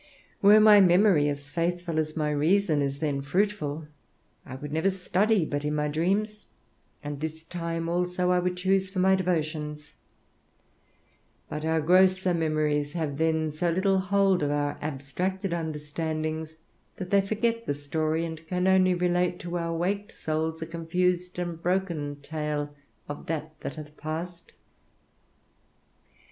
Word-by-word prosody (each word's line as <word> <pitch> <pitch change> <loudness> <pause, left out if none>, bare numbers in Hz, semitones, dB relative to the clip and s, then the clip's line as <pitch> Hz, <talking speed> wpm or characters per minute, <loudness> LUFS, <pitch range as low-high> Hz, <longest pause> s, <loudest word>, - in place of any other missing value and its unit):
Were 205 +2 +8
my 210 -1 +8
memory 180 -4 +5
as 145 0 -6
faithful 170 0 -1
as 155 0 -2
my 150 -1 0
reason 155 +1 +2
is 140 0 -1
then 145 -2 -1
fruitful, 160 -1 -1 0.6
I 130 - -7
would 145 +2 -7
never 160 +5 +2
study 190 +1 +1
but 145 -1 -3
in 150 0 -1
my 150 0 0
dreams, 200 +7 -1 0.6
and 145 -1 -5
this 160 +1 -5
time 165 -1 -4
also 180 +1 0
would 180 +1 +1
I - - -10
choose 190 +1 +1
for 190 - -8
my 190 +1 +4
devotions; 155 -5 -2 1.6
but 150 0 -4
our 160 0 +1
grosser 185 +2 +4
memories 155 -3 0
have 155 -4 -3
then 160 -1 +1
so 165 +4 -1
little 190 +3 +2
hold 195 -1 +2
of 145 - +1
our 145 0 -1
abstracted 170 +7 -3
understandings 155 0 -3 0.4
that 185 -1 -7
they 200 -1 +5
forget 230 +3 -1
the 145 - 0
story, 155 +3 -1
and 160 -1 -7
can 180 +1 -1
only 185 -1 +4
relate 180 0 +1
to 175 0 -5
our 170 - -2
awaked 195 +6 -1
souls 160 +1 -2
a - - -4
confused 180 +2 -1
and 175 -2 -4
broken 170 -6 -1
tale 150 -1 -3 0.3
of 145 - -7
that 155 -1 -3
that - - -6
hath 150 -1 -10
passed. 170 +3 -6
165 Hz, 150 wpm, -27 LUFS, 150-185 Hz, 1.6 s, Were